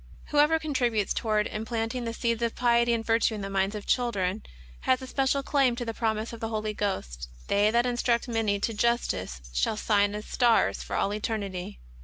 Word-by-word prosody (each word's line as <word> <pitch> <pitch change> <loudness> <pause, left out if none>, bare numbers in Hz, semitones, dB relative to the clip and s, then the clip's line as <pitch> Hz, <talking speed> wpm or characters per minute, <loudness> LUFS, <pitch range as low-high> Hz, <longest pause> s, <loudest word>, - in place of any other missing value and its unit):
Whoever 300 +2 +4
contributes 245 -9 0
toward 215 -2 +1
implant 225 +1 -3
ing 250 -2 -3
the 230 - -3
seeds 235 -1 -1
of 235 -1 -1
piety 235 -1 +3
and 230 -1 0
virtue 225 0 +2
in 210 - -5
the 195 0 -5
minds 195 +2 0
of 210 - -6
chil 245 -2 +1
dren, 190 0 -1 0.4
has 255 - +2
a 260 - -7
special 270 +1 0
claim 270 -4 +2
to 240 0 -4
the 225 - -3
promise 220 0 -2
of 230 - -8
the 225 - -3
Holy 215 -1 -2
Ghost: 65 - -3
" - - -21
They 205 +1 +4
that 235 +2 +2
instruct 240 -1 +1
many 225 -4 0
to 230 - 0
justice, 205 - -1
shall 65 - +1
shine 205 -1 +2
as 210 - -6
stars 240 -3 +2
for - - -5
all 200 - 0
eternity." 200 - -4
225 Hz, 210 wpm, -27 LUFS, 205-240 Hz, 0.4 s, Whoever